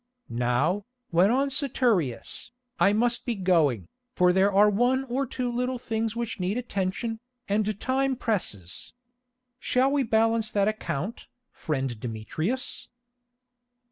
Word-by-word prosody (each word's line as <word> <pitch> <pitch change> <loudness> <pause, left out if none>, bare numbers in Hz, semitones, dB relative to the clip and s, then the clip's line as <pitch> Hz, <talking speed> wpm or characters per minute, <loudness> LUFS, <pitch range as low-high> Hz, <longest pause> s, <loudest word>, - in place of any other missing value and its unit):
"Now," 125 - +1 0.2
went 180 +5 +4
on 275 +3 +2
Saturius, 240 - 0 0.3
"I 200 - +5
must 235 +3 +1
be 240 - -2
going, 160 - +2 0.3
for 180 -1 +4
there 190 +2 +4
are 200 +2 +6
one 245 +6 +2
or 270 +1 -2
two 250 0 -2
little 250 +1 -1
things 225 -1 -2
which 235 -3 -3
need 185 +5 -1
attention, 220 0 -2 0.3
and 210 0 0
time 265 +1 +1
presses. 175 - -2 0.7
Shall 260 +2 +2
we 285 0 +2
balance 225 -1 +2
that 200 -1 +1
account, 215 -2 -3 0.2
friend 135 -6 -3
Demetrius?" 155 - -3
215 Hz, 125 wpm, -27 LUFS, 180-245 Hz, 0.7 s, are